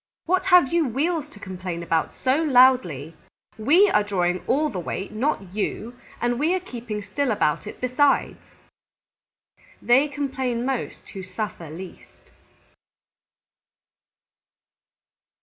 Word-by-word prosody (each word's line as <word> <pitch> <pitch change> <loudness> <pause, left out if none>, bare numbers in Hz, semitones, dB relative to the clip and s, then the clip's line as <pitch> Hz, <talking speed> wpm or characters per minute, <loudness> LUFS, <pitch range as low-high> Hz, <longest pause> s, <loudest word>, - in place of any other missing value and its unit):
"What 365 +2 +1
have 355 -6 +5
you 335 -4 +2
Wheels 300 +5 -1
to 210 - -14
complain 185 -3 -6
about 165 -1 0
so 260 +1 0
loudly? 250 - +3 0.4
We 330 - +5
are 210 - +4
drawing 180 -3 -1
all 300 +4 +2
the 190 - -5
weight, 190 +3 -5
not 215 -6 -2
you, 215 +3 -3 0.2
and 240 0 0
we 325 +5 +2
are - - 0
keeping 235 - -6
still 280 +6 -2
about 150 -9 0
it - - -9
besides." 255 +3 +1 1.5
_They 270 +5 +4
complain 265 -4 -2
most 265 -2 -4
who 195 - -7
suffer 185 -3 -6
least. 175 +4 -12
240 Hz, 120 wpm, -24 LUFS, 190-285 Hz, 1.5 s, have